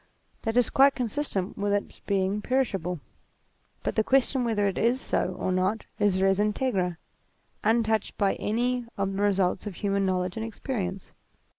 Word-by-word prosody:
That 225 +1 -1
is 245 - +3
quite 275 +1 +5
consistent 235 -7 -2
with 205 0 +1
its 205 - -2
being 195 +1 +1
perishable; 195 - 0 0.8
but - - -2
the 220 - +3
question 265 +1 +2
whether 220 -3 +1
it 195 - -1
is 240 +3 +2
so 185 -7 -1
or 185 - -1
not 185 +4 0
is 205 -3 +3
res 195 0 +3
Integra, 205 -5 0 0.7
untouched 220 -1 +1
by 200 -1 +2
any 240 +2 0
of 195 -1 -1
the 195 - -2
results 195 -1 +1
of 200 - -6
human 200 +1 0
knowledge 185 +1 -1
and 220 - -2
experience. 200 -4 -4
205 Hz, 160 wpm, -27 LUFS, 190-235 Hz, 0.8 s, quite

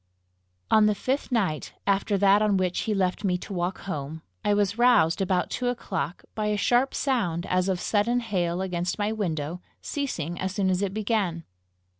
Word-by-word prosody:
On 215 -1 +6
the 210 - +2
fifth 265 +6 -2
night 190 -11 0
after 200 +1 +1
that 200 +1 +5
on 210 -2 +3
which 185 -1 0
he - - +2
left 185 +1 0
me 180 -3 +1
to 195 - -8
walk 180 +1 -2
home, 155 -3 -5 0.2
I 210 - +2
was 205 +1 +1
roused, 220 -9 +4
about 185 -2 0
two 250 - -1
o'clock, 180 - -3
by 215 -1 -2
a 210 0 +1
sharp 245 +5 +2
sound 185 - 0
as 185 +1 +1
of 185 -2 0
sudden 230 +5 +1
hail 185 -5 -1
against 175 -1 -2
my 210 0 0
window, 170 -5 -3 0.2
ceasing 175 - -3
as 190 0 -3
soon 190 -2 +1
as 185 +1 0
it 200 -2 0
began. 205 -6 -1
195 Hz, 185 wpm, -26 LUFS, 180-215 Hz, 0.2 s, On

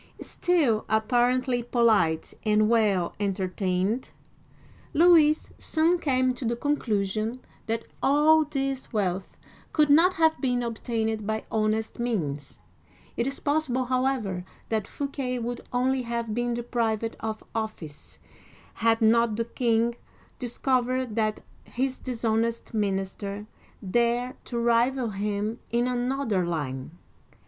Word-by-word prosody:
*' - - -29
Still 300 -12 +1
apparently 245 +3 +2
polite 220 -10 +2
and 215 0 +3
well 210 -6 +2
entertained, 195 +2 -1 0.9
Louis 315 -2 +5
soon 330 +3 +2
came 255 -4 +2
to 250 - -7
the 235 0 0
conclusion 225 -4 -1 0.3
that 225 0 -2 0.2
all 305 +3 +5
this 275 -3 -3
wealth 190 -3 -2 0.4
could 300 -2 +4
not 345 +5 +6
have 320 -1 +3
been 245 -3 +1
obtained 225 -2 -2
by 220 0 -1
honest 220 +1 0
means. 150 - -2 0.6
It 235 - 0
is 275 - -3
possible, 285 -4 0
however, 255 -8 0 0.3
that 220 -3 -1
Fouquet 275 -3 -3
would 240 0 -4
only 255 +1 +1
have 235 -2 -3
been 240 +1 -1
deprived 230 -2 -1
of 220 -1 -4
office, 215 -10 -5 0.6
had 225 0 +2
not 230 0 +4
the 230 +1 -1
king 235 0 +1 0.4
discovered 255 -1 0
that 215 -2 0 0.2
his 260 +1 -2
dishonest 230 -2 -1
minister 200 0 -2 0.4
dared 240 +4 0
to 240 - -4
rival 235 +1 +2
him 205 +2 -2
in 240 +1 +1
another 245 -5 0
line. 150 -2 -4
235 Hz, 120 wpm, -26 LUFS, 215-255 Hz, 0.9 s, not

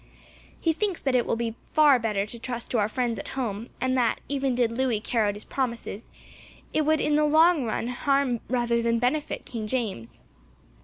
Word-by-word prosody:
He 325 - +2
thinks 390 +1 -1
that 270 - -1
it 245 -2 +2
will - - +1
be 230 -1 -2 0.2
far 295 -4 +6
better 210 -3 0
to 230 +3 -9
trust 240 0 -5
to 240 - +2
our 205 0 +1
friends 235 -2 -1
at - - -7
home, 225 -3 -3
and 255 +1 0
that, 235 -2 +1
even 270 -2 0
did 240 -2 +2
Louis 250 -4 +1
carry 220 0 0
out 205 - -3
his 210 - -8
promises, 235 -4 -3 0.6
it 310 -1 +1
would 315 0 +3
in 295 +1 +2
the 305 - +3
long 315 -1 +4
run 230 +1 -2
harm 270 -1 +1
rather 240 -1 +1
than 230 0 +1
benefit 285 +6 -1
King 225 -3 -5
James." 210 - -3
245 Hz, 200 wpm, -26 LUFS, 230-275 Hz, 0.6 s, far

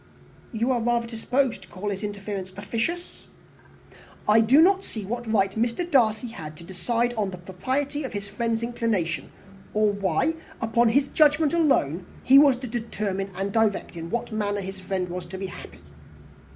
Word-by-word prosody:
"You 235 +3 0
are 245 -2 +1
rather 235 0 +1
disposed 245 +3 0
to - - -14
call 205 +3 -4
his 195 0 -4
interference 200 -2 -4
officious?" 235 - -3 1.0
"I 215 +1 +6
do 245 +6 +5
not 385 +4 +5
see 215 - -6
what 240 +2 -4
right 195 -3 +3
Mr. 235 - -1
Darcy 240 -6 +2
had 155 -8 -8
to 170 - -11
decide 230 +7 -1
on 210 -4 -1
the 185 - -7
propriety 265 - -2
of 260 - -5
his 200 -1 -4
friend's 225 +2 -1
inclination; 225 -8 -1 0.5
or 215 -1 +4
why, 200 - +1 0.3
upon 230 +1 +3
his 275 +4 +3
own - - -21
judgment 300 0 +4
alone, 190 - +2 0.2
he 270 +2 +8
was 285 -3 +6
to 255 +1 -7
determine 210 -4 -3
and 195 +2 -2
direct 220 -5 +1
in 165 0 -6
what 235 +3 -2
manner 205 -1 -1
that 190 +1 -5
friend 190 -1 -3
was 180 0 -6
to 190 +2 -7
be 195 - -4
happy. 185 - -10
220 Hz, 180 wpm, -25 LUFS, 195-245 Hz, 1.0 s, he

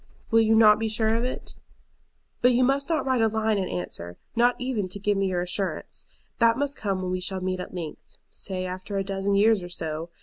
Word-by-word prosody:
Will 225 0 +6
you 220 0 +4
not 215 -1 +7
be 225 0 -1
sure 220 0 +1
of 230 +1 0
it? 255 - -4 0.9
"But 250 +1 +5
you 250 +1 +3
must 275 +4 +1
not 320 -3 0
write 260 -3 +2
a 225 - +5
line 220 -1 0
in 185 - -2
answer, 90 -1 -5 0.2
not 240 +1 +4
even 245 -7 -2
to 185 - -5
give 205 +1 +1
me 195 0 +1
your 180 -2 0
assurance. 185 +2 -3 0.3
That 230 0 +4
must 285 +1 -1
come 195 -3 -2
when 180 - -2
we 185 - -1
shall 190 +1 -2
meet 185 0 -2
at 180 - -7
length, 165 -4 -6 0.3
say 185 -1 -4
after 185 +2 -5
a 195 - 0
dozen 195 +1 -1
years 215 0 +4
or 175 - -7
so. 160 -1 -4
200 Hz, 230 wpm, -26 LUFS, 185-230 Hz, 0.9 s, not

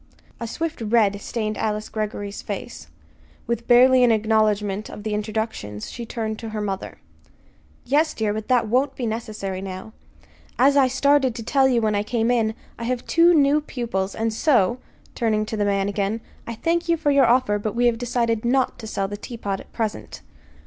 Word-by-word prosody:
A 230 - -4
swift 325 +3 -4
red 210 -2 +2
stained 215 -1 -3
Alice 215 0 -1
Greggory's 210 -2 -4
face. 225 +4 -6 0.6
With 235 0 -3
barely 255 +1 +6
an 240 - +5
acknowledgment 215 -2 +1
of 210 - -9
the 215 -1 -2
introductions 210 - -4
she 235 -1 -7
turned 220 -2 -4
to 225 - -6
her 215 0 -4
mother. 195 -2 -4 0.9
"Yes, 295 +5 +2
dear, 215 -2 0
but 215 0 -5
that 245 -3 +2
won't 265 +5 +1
be 250 - -3
necessary 215 -4 -4
now. 190 +2 -7 0.6
As 275 +3 +5
I 275 -2 +5
started 270 -1 +2
to 230 - -6
tell 270 +3 +3
you 240 -3 +2
when 215 -1 +2
I 205 - +1
came 230 +2 0
in, 225 -2 +1 0.2
I 235 - -4
have 250 0 -2
two 340 +1 +5
new 290 0 +4
pupils; 225 -9 -3
and 225 0 -1
so" 240 - +2 0.3
turning 215 -2 0
to 220 - -4
the 205 -1 0
man 200 -1 +1
again 205 +2 -1 0.3
"I 235 - -4
thank 335 +7 -1
you 335 - +3
for 295 -2 +1
your 275 -3 +5
offer, 235 -4 +3
but 210 +1 -3
we 245 +1 +2
have 235 -2 +2
decided 235 -2 0
not 255 +2 +1
to 220 - -7
sell 195 -2 -2
the 205 +1 -6
teapot 205 -4 -5
at - - -14
present." 220 -2 -4
225 Hz, 190 wpm, -23 LUFS, 210-250 Hz, 0.9 s, barely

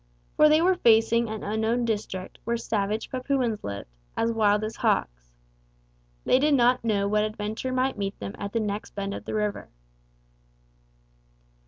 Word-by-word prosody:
For 305 - +6
they 310 +2 +4
were 375 +1 +5
facing 230 -5 +3
an 220 -1 -5
unknown 220 +3 0
district 205 -4 -4
where 235 +1 -1
savage 215 -1 -2
Papuans 255 -4 -1
lived 100 0 -5 0.3
as 230 - +1
wild 210 -2 +2
as 215 +1 -4
hawks. - - -1 0.9
They 255 - +4
did 295 +1 +3
not 250 -1 +3
know 205 -3 +1
what 210 +1 +2
adventure 215 +3 -3
might 255 -2 0
meet 195 0 -3
them 100 0 -6
at 200 - -4
the 230 - 0
next 210 -1 -4
bend 200 0 -3
of - - -7
the - - -4
river. 210 -1 -2
220 Hz, 160 wpm, -26 LUFS, 205-240 Hz, 0.9 s, For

